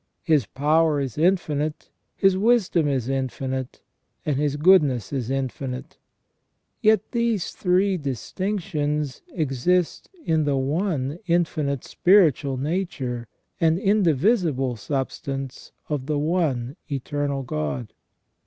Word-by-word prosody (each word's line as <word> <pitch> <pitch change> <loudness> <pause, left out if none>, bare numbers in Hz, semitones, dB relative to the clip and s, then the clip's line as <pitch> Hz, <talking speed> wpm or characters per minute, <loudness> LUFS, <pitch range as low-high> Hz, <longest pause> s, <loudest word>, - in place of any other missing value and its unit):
His 150 -9 +2
power 150 +1 +2
is 135 -5 -3
infinite, 155 -3 0 0.2
His 195 -1 +3
wisdom 195 -6 +3
is 130 -4 0
infinite, 130 -1 -3 0.4
and 145 -3 0
His 145 0 0
goodness 150 - +4
is 130 -4 -2
infinite; 130 -1 -4 0.8
yet 215 -2 +3
these 235 -5 0
three 185 +1 +2
distinctions 150 - -2
exist 165 - 0 0.2
in 160 -1 +2
the 140 -2 +1
one 145 +1 -1
infinite 155 -6 0
spiritual 155 -8 +3
nature 135 - -3 0.3
and 165 -2 +3
indivisible 175 - +2
substance 135 +2 -4 0.2
of 140 -3 -3
the 150 -1 0
One 145 -4 0
Eternal 140 0 -2
God. 75 - -3
150 Hz, 105 wpm, -24 LUFS, 135-180 Hz, 0.8 s, goodness